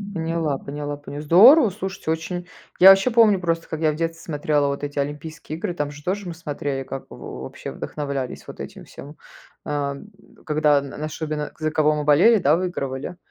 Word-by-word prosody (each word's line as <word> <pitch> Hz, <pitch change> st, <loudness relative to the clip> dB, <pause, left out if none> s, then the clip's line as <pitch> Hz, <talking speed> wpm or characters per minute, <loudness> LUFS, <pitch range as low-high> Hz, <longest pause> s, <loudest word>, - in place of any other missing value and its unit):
Поняла, 160 Hz, -3 st, -1 dB
поняла, 145 Hz, +1 st, -5 dB
понял 145 Hz, 0 st, -8 dB
здорово. 220 Hz, -, +7 dB
Слушайте, 190 Hz, -3 st, -4 dB
очень. 175 Hz, +2 st, -4 dB, 0.3 s
Я 190 Hz, +2 st, +10 dB
вообще 195 Hz, +6 st, +6 dB
помню 220 Hz, -4 st, +5 dB
просто, 165 Hz, -1 st, -1 dB
как 160 Hz, -, -5 dB
я 155 Hz, -1 st, +3 dB
в -, -, -5 dB
детстве 165 Hz, +1 st, -3 dB
смотрела 150 Hz, -2 st, 0 dB
вот 140 Hz, +1 st, -3 dB
эти 145 Hz, -, -8 dB
Олимпийские 150 Hz, +2 st, -5 dB
игры, 175 Hz, -, -3 dB
там 145 Hz, -3 st, -3 dB
же 150 Hz, +1 st, -12 dB
тоже 195 Hz, +1 st, -2 dB
мы 175 Hz, -, -5 dB
смотрели, 145 Hz, -4 st, -4 dB
как 135 Hz, 0 st, -7 dB
во -, -, -9 dB
вообще 65 Hz, -, -7 dB
вдохновлялись 140 Hz, -3 st, -5 dB
вот -, -, -9 dB
этим -, -, -9 dB
всем. 145 Hz, +2 st, -12 dB, 0.5 s
Э, 145 Hz, -2 st, -2 dB, 0.5 s
когда 150 Hz, -1 st, +3 dB
н 140 Hz, 0 st, -7 dB
нашу 155 Hz, +2 st, -5 dB
бе 150 Hz, -1 st, -3 dB
за 155 Hz, 0 st, -1 dB
кого 155 Hz, -1 st, +3 dB
мы 150 Hz, -, -2 dB
болели, 170 Hz, +11 st, +6 dB
да, 145 Hz, +1 st, +4 dB
выигрывали. 170 Hz, -3 st, -4 dB
155 Hz, 190 wpm, -22 LUFS, 145-170 Hz, 0.5 s, Я